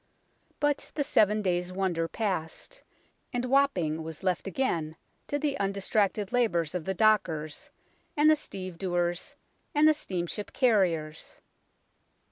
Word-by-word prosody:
But 290 -1 0
the 290 - +1
seven 210 -4 +3
days' 180 -1 0
wonder 185 -3 -1
passed, 195 - -4 0.5
and 245 -1 -1
Wapping 245 - +2
was 160 +2 -8
left 185 0 0
again 170 -8 -1 0.3
to 290 - -1
the 290 -1 -1
undistracted 200 +1 0
labours 175 -10 +1
of 180 -3 -3
the 190 - -2
dockers 170 -8 +1 0.5
and 295 +1 +5
the 310 - +7
stevedores 175 - -3 0.4
and 300 +1 +6
the 310 - +6
steamship 190 - -4
carriers. 175 - +1
190 Hz, 120 wpm, -28 LUFS, 170-245 Hz, 0.5 s, the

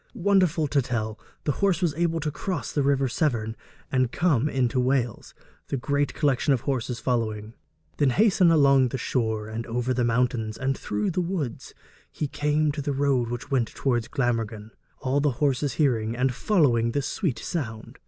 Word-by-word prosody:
Wonderful 185 -4 +2
to 140 0 +2
tell, 110 -3 -3 0.2
the 150 - +1
horse 195 -4 +3
was 175 -5 +1
able 165 +1 0
to 150 0 -2
cross 180 +4 -4
the 145 - 0
river 140 -1 +2
Severn 115 -5 -1 0.4
and 130 -2 +1
come 150 -6 +2
into 130 -1 0
Wales, 125 -3 -1 0.3
the 140 - -2
great 140 +2 -1
collection 145 -1 +2
of 125 - 0
horses 125 -3 -2
following. 110 -3 -2 0.4
'Then 145 -3 +3
hastening 190 - +4
along 140 -4 +5
the 130 - -3
shore, 110 -4 -1
and 110 +1 -4
over 125 +2 -1
the 125 0 0
mountains, 115 -2 0
and 135 +1 -1
through 105 - -2
the 180 +2 0
woods, 170 -9 -4 0.4
he 150 - -3
came 150 +1 +1
to 145 0 -4
the 145 0 -2
road 135 -4 +1
which 120 +4 -6
went 125 -4 +2
towards 120 -4 0
Glamorgan, 115 -4 -2 0.3
all 135 +2 +1
the 145 -2 +1
horses 140 -2 +1
hearing, 115 -7 +1
and 125 +1 +1
following 125 - +2
the 140 - 0
sweet 155 - -2
sound.' 115 -9 -5
130 Hz, 175 wpm, -25 LUFS, 120-150 Hz, 0.4 s, along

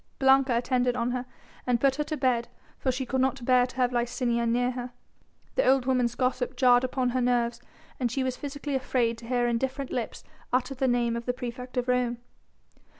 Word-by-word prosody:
Blanca 265 -2 +4
attended 250 0 +1
on 240 0 0
her 250 0 -3 0.4
and 245 -1 +2
put 270 +1 +2
her 300 - +1
to 310 - -3
bed 245 -4 +1 0.3
for 260 - +1
she 255 +1 -3
could 260 +1 0
not 265 -1 0
bear 250 -1 +4
to 255 - -13
have 250 -1 +1
Licinia 240 -1 0
near 245 +2 +1
her. 250 0 -5 0.6
The - - +1
old 265 -1 +3
woman's 250 -2 +1
gossip 255 0 -1
jarred 245 -1 +5
upon 255 -1 0
her 255 +1 0
nerves 240 -1 +1 0.4
and 245 -3 0
she 265 +2 -1
was 255 -1 -1
physically 285 +1 -5
afraid 245 -3 0
to 230 - -11
hear 245 0 +1
indifferent 265 +3 -2
lips 240 -3 -4 0.3
utter 250 +1 +1
the 265 0 0
name 240 -1 +1
of 235 +1 -5
the 245 - +1
praefect 250 +1 -7
of 250 0 0
Rome. 250 -1 +1
250 Hz, 205 wpm, -27 LUFS, 240-260 Hz, 0.6 s, jarred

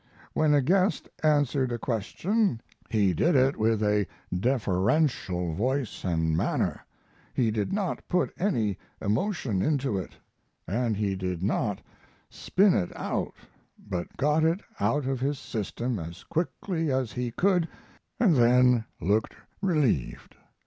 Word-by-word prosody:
When 155 -1 +3
a 140 - +3
guest 185 +7 +2
answered 145 -4 +2
a 120 - -1
question 125 - 0 0.3
he 100 -4 +2
did 165 - +2
it 135 +1 +4
with 110 0 +1
a 105 -2 +2 0.3
deferential 95 - +1
voice 130 - -1
and 80 -3 +1
manner; - - 0 0.5
he 115 -4 +2
did 105 -2 -1
not 195 -2 -2
put 180 0 +1
any 115 - 0 0.2
emotion 110 - 0
into 135 -6 0
it, 90 - -7 0.5
and 110 +3 0
he 100 -2 0
did 90 -2 -3
not 105 0 0 0.5
spin 195 0 +3
it 90 - 0
out, - - -2 0.4
but 90 -4 -6
got 150 +3 +2
it 165 +5 +2 0.2
out 145 -2 +1
of 135 -1 -1
his 140 +2 -1
system 115 -1 -3
as 85 +2 -8
quickly 165 -1 -2
as 130 -3 0
he 125 -1 -2
could, 180 +6 +2 0.5
and 205 -9 +4
then 125 -1 +5
looked 105 +5 0 0.3
relieved. 150 - 0
125 Hz, 135 wpm, -27 LUFS, 105-155 Hz, 0.5 s, then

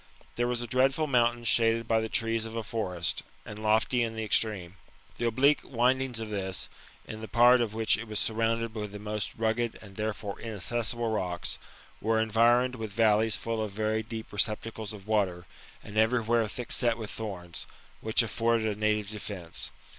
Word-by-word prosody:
There 120 0 +1
was 120 -1 -1
a - - -3
dreadful 135 +5 +2
mountain 120 -3 +2
shaded 115 -1 +3
by 110 0 +3
the 110 - -3
trees 115 0 0
of 110 - -8
a 115 - -2
forest, 90 -7 -2 0.2
and 105 0 -8
lofty 110 +3 +2
in 115 -1 -1
the 110 - -3
extreme. 100 -4 0 0.4
The 120 - 0
oblique 140 +6 +4
windings 125 0 +1
of 110 -1 -5
this, 95 -2 -2 0.4
in 110 0 -7
the 110 - -6
part 120 +3 +6
in 115 - +1
which 110 +1 +2
it 115 +2 -7
was 105 -1 -3
surrounded 115 +1 0
with 105 -2 -5
the - - -5
most 105 0 -4
rugged 115 +1 0
and 100 -2 -14
therefore 105 -1 -3
inaccessible 115 +2 -1
rocks, 90 -5 -1 0.4
were 110 +1 +2
environed 120 +3 +3
with 110 -2 -5
valleys 110 0 +3
full 115 -1 -2
of 105 -2 -3
very 110 +1 0
deep 110 0 -7
receptacles 110 +1 0
of 105 -1 -10
water, 95 -5 0 0.4
and 105 +1 -3
everywhere 115 0 +2
thick 120 +3 -6
set 120 -2 +3
with 110 -2 -6
thorns, 90 -6 -6 0.3
which 110 +2 +3
afforded 115 -1 +1
a - - -14
native 105 -1 +1
defence. 100 -5 -5
110 Hz, 180 wpm, -29 LUFS, 105-115 Hz, 0.4 s, part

